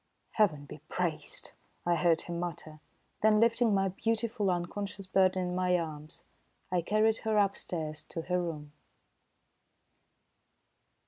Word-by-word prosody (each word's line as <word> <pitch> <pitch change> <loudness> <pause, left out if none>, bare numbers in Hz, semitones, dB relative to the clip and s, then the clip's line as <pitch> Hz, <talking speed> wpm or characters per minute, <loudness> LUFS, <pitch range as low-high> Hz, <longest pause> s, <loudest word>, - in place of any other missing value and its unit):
"Heaven 160 -10 +2
be - - -10
praised!" - - -1 0.3
I 175 0 +3
heard 170 -1 +3
him 170 -1 -5
mutter. 155 -3 -5 0.4
Then 215 0 +5
lifting 230 0 +4
my 195 -1 +2
beautiful, 225 +1 -1
unconscious 195 +3 -3
burden 185 -1 +2
in - - -3
my 180 -1 +2
arms, 155 -2 -6 0.5
I 180 -1 +2
carried 215 +5 +2
her 220 -1 0
upstairs 165 -6 0
to 165 - -5
her 180 +1 0
room. 150 -4 -5
180 Hz, 125 wpm, -31 LUFS, 170-210 Hz, 0.5 s, Then